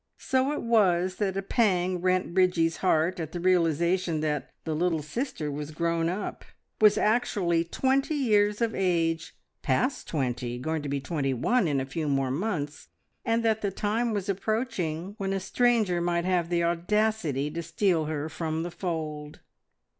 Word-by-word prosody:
So 260 +1 +1
it 300 - -3
was 185 -6 +2
that 195 -2 -1
a 195 - -2
pang 185 -5 +1
rent 185 -1 +1
Bridgie's 180 -3 +2
heart 180 0 +1
at 160 -1 -5
the 175 - -3
realisation 170 -1 +2
that 150 -2 -2
the 160 - -2
little 165 -1 0
sister 155 - -3
was 145 +1 -5
grown 165 +1 0
up, 190 +4 -4 0.4
was 210 -1 +6
actually 195 -7 +2
twenty 270 - 0
years 210 -5 +2
of 230 -1 +1
age 165 -3 0 0.3
past 250 - 0
twenty, 125 -4 -2
going 160 +5 -2
to 145 - -5
be 140 0 -1
twenty 135 -3 -1
one 235 - +2
in 140 -3 +1
a 130 - -2
few 150 +3 -3
more 135 -2 +1
months, 150 -2 -3 0.4
and 230 -1 +1
that 220 -1 +2
the 200 - 0
time 220 +4 -1
was 205 -2 -2
approaching 195 -4 -2
when 195 -1 -1
a 195 - 0
stranger 215 -3 +2
might 170 0 0
have 180 -2 +1
the 170 -1 +1
audacity 170 -4 0
to 170 - -4
steal 170 -1 +1
her 150 -1 -3
from 160 0 -3
the 175 - -5
fold. 155 -4 -4
175 Hz, 170 wpm, -27 LUFS, 155-205 Hz, 0.4 s, was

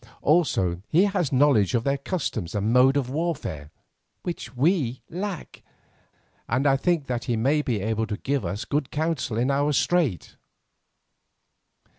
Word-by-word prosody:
Also 95 - +2
he 170 +5 +4
has 195 -7 0
knowledge 130 -7 +3
of 115 - +1
their 140 +1 0
customs 135 - -3
and 105 +3 0
mode 130 +2 +5
of 135 -3 0
warfare, 145 - -3 0.5
which 135 -8 -6
we 140 -4 +1
lack, 185 0 -5 0.9
and 130 +4 +1
I 135 -1 +5
think 165 +1 0
that 120 -2 -3
he 120 -2 0
may 140 +7 +2
be 120 -8 -2
able 110 +2 -1
to 105 -2 -3
give 140 +3 -1
us 105 +3 -4
good 145 -2 -1
counsel 155 -7 -2
in 125 +4 +1
our 145 +2 +1
strait." 145 - 0
135 Hz, 150 wpm, -25 LUFS, 115-155 Hz, 0.9 s, mode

